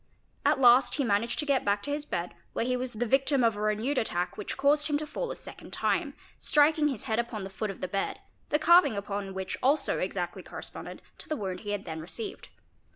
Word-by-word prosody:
At -, -, +3 dB
last 250 Hz, 0 st, +6 dB
he 285 Hz, -, +1 dB
managed 230 Hz, +1 st, +1 dB
to 300 Hz, -, -1 dB
get 280 Hz, -3 st, +2 dB
back 200 Hz, 0 st, +1 dB
'to 285 Hz, -, -3 dB
his 295 Hz, 0 st, -2 dB
bed 175 Hz, -, -3 dB, 0.2 s
where -, -, 0 dB
he 250 Hz, 0 st, +1 dB
was 250 Hz, 0 st, -3 dB
the 230 Hz, +2 st, -1 dB
victim 270 Hz, +2 st, +3 dB
of 225 Hz, -2 st, +3 dB
a 205 Hz, -, -5 dB
renewed 215 Hz, +6 st, +1 dB
attack 180 Hz, -5 st, -1 dB
which 210 Hz, -, -5 dB
caused 290 Hz, +2 st, +3 dB
him 295 Hz, -1 st, +1 dB
to 305 Hz, -, -4 dB
fall 485 Hz, +11 st, -4 dB
a -, -, -4 dB
second -, -, -10 dB
time, -, -, 0 dB, 0.2 s
striking 300 Hz, +1 st, +4 dB
his 265 Hz, -8 st, -3 dB
head 220 Hz, +1 st, 0 dB
upon 235 Hz, -3 st, -3 dB
the 190 Hz, -, -7 dB
foot 210 Hz, +2 st, -3 dB
of 195 Hz, -, -7 dB
the 185 Hz, -, -1 dB
bed, 195 Hz, +1 st, -2 dB, 0.3 s
the 300 Hz, -, +3 dB
carving 340 Hz, -, +5 dB
upon 200 Hz, -1 st, -4 dB
which 190 Hz, 0 st, -4 dB
also 275 Hz, +2 st, +2 dB
exactly 180 Hz, -2 st, -3 dB
corresponded -, -, -8 dB, 0.2 s
to -, -, -6 dB
the 310 Hz, -, 0 dB
wound 190 Hz, -4 st, -4 dB
he 205 Hz, -, -7 dB
had 205 Hz, -1 st, -2 dB
then 160 Hz, 0 st, -5 dB
received. 385 Hz, -, -6 dB
235 Hz, 230 wpm, -29 LUFS, 200-285 Hz, 0.3 s, last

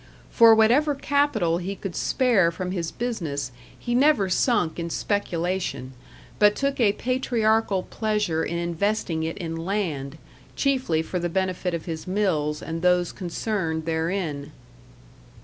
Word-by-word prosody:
For 230 Hz, -1 st, +7 dB
whatever 260 Hz, +7 st, +4 dB
capital 275 Hz, -, +1 dB
he 190 Hz, +3 st, -4 dB
could 195 Hz, -3 st, -6 dB
spare 235 Hz, -10 st, +2 dB
from 180 Hz, +2 st, -4 dB
his 170 Hz, -3 st, -2 dB
business 160 Hz, -, -3 dB, 0.3 s
he 240 Hz, -, -3 dB
never 250 Hz, -7 st, +3 dB
sunk 180 Hz, -6 st, +1 dB
in 170 Hz, 0 st, -3 dB
speculation, 175 Hz, -8 st, -2 dB, 0.5 s
but 210 Hz, 0 st, +5 dB
took 275 Hz, 0 st, -1 dB
a 210 Hz, -4 st, +4 dB
patriarchal 225 Hz, -6 st, +1 dB
pleasure 210 Hz, -7 st, -1 dB
in 170 Hz, -, -2 dB
investing 170 Hz, 0 st, -1 dB
it 160 Hz, +1 st, -3 dB
in 165 Hz, -2 st, -4 dB
land, 165 Hz, -6 st, -3 dB, 0.4 s
chiefly 255 Hz, -, +1 dB
for 180 Hz, +3 st, -3 dB
the 175 Hz, 0 st, -2 dB
benefit 185 Hz, -1 st, -1 dB
of 165 Hz, -, -6 dB
his 160 Hz, -1 st, -6 dB
mills 165 Hz, -6 st, 0 dB
and 165 Hz, 0 st, -4 dB
those 180 Hz, -1 st, +2 dB
concerned 175 Hz, -3 st, -3 dB
therein. 160 Hz, -3 st, -2 dB
185 Hz, 135 wpm, -24 LUFS, 165-220 Hz, 0.5 s, For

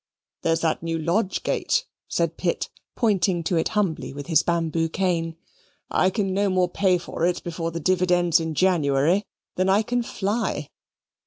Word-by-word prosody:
"There 165 Hz, -, +2 dB
is 165 Hz, -, -1 dB
that 160 Hz, -1 st, 0 dB
new 165 Hz, 0 st, -2 dB
lodge 180 Hz, +5 st, 0 dB
gate," -, -, 0 dB, 0.2 s
said -, -, 0 dB
Pitt, -, -, -1 dB, 0.3 s
pointing 195 Hz, -6 st, +1 dB
to 175 Hz, -, 0 dB
it 160 Hz, -, +2 dB
humbly 185 Hz, -9 st, 0 dB
with 145 Hz, 0 st, -7 dB
the 165 Hz, -1 st, +3 dB
bamboo 165 Hz, -1 st, 0 dB
cane, 165 Hz, -2 st, -1 dB, 0.5 s
"I 185 Hz, -, +3 dB
can 195 Hz, -1 st, -1 dB
no 200 Hz, +1 st, +2 dB
more 185 Hz, -1 st, +2 dB
pay 185 Hz, 0 st, +2 dB
for 170 Hz, -, -5 dB
it 180 Hz, +1 st, +1 dB
before 165 Hz, -1 st, -3 dB
the 165 Hz, 0 st, -4 dB
dividends 175 Hz, -1 st, +3 dB
in 160 Hz, -1 st, -3 dB
January 165 Hz, +1 st, +3 dB, 0.3 s
than 185 Hz, +1 st, +2 dB
I 200 Hz, +3 st, +4 dB
can 245 Hz, +2 st, 0 dB
fly." 215 Hz, 0 st, -2 dB
175 Hz, 170 wpm, -24 LUFS, 165-190 Hz, 0.5 s, I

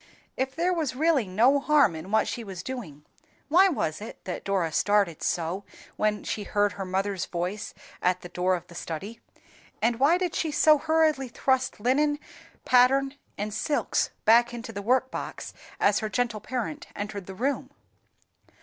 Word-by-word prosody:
If 265 Hz, 0 st, -2 dB
there 350 Hz, +3 st, +1 dB
was 315 Hz, -7 st, -1 dB
really 295 Hz, -, +2 dB
no 240 Hz, +10 st, +4 dB
harm 285 Hz, -, +4 dB
in 160 Hz, +4 st, -8 dB
what 220 Hz, 0 st, +2 dB
she 235 Hz, -, -4 dB
was 190 Hz, -4 st, -7 dB
doing, 170 Hz, -, -7 dB, 0.4 s
why 365 Hz, +5 st, +6 dB
was 160 Hz, -, -2 dB
it 220 Hz, -, -8 dB
that 185 Hz, -, -5 dB
Dora 190 Hz, -5 st, 0 dB
started 200 Hz, -2 st, +2 dB
so 175 Hz, +4 st, -1 dB, 0.3 s
when 210 Hz, -1 st, 0 dB
she 215 Hz, -, -3 dB
heard 205 Hz, 0 st, +1 dB
her 195 Hz, -1 st, -5 dB
mother's 190 Hz, 0 st, -1 dB
voice 180 Hz, +4 st, -4 dB, 0.3 s
at 180 Hz, 0 st, +1 dB
the 175 Hz, -, -9 dB
door 180 Hz, +1 st, +1 dB
of 175 Hz, -, -7 dB
the -, -, -15 dB
study, 180 Hz, +7 st, -6 dB, 0.6 s
and 230 Hz, +1 st, +1 dB
why 295 Hz, +6 st, +5 dB
did 360 Hz, -2 st, -2 dB
she 320 Hz, -, -1 dB
so 305 Hz, 0 st, +5 dB
hurriedly 315 Hz, -4 st, +2 dB
thrust 260 Hz, +1 st, 0 dB
linen, 290 Hz, +6 st, +2 dB, 0.5 s
pattern, 265 Hz, +2 st, +4 dB, 0.2 s
and 210 Hz, +1 st, -3 dB
silks 290 Hz, -, 0 dB, 0.2 s
back 235 Hz, +2 st, +5 dB
into 230 Hz, -1 st, -7 dB
the 200 Hz, -, -4 dB
workbox 255 Hz, +4 st, -1 dB, 0.3 s
as 200 Hz, 0 st, +3 dB
her 215 Hz, -, -3 dB
gentle 235 Hz, -2 st, -1 dB
parent 260 Hz, +4 st, -4 dB
entered 205 Hz, -2 st, -5 dB
the 190 Hz, -, -8 dB
room? 270 Hz, +7 st, -1 dB
225 Hz, 165 wpm, -27 LUFS, 195-270 Hz, 0.6 s, why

